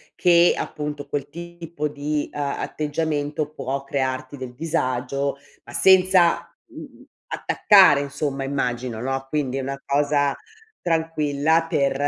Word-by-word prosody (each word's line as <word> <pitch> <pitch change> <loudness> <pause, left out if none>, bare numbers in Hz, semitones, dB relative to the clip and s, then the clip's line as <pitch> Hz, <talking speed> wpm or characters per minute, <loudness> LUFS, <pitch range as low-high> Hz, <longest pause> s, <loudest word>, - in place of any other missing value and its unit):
che 175 -1 +5
appunto 150 -1 -5
quel 140 0 -3
tipo 170 -1 -6
di 145 0 -3
a 145 -1 -3
atteggiamento 150 -1 -2
può 135 -1 -4
crearti 130 -1 -3
del 130 -2 -7
disagio, 140 -3 -1 0.3
ma - - -13
senza, 185 -2 +4
mhmm, - - -12 0.2
attaccare 190 -9 +5
insomma, 140 -1 -3
immagino, 125 -4 -2
no, 135 +1 -2
quindi 135 -3 -1
è - - -1
una 135 +1 -4
cosa 145 0 +1 0.5
tranquilla 160 -1 +1
per 140 -3 +1
145 Hz, 120 wpm, -23 LUFS, 135-160 Hz, 0.5 s, che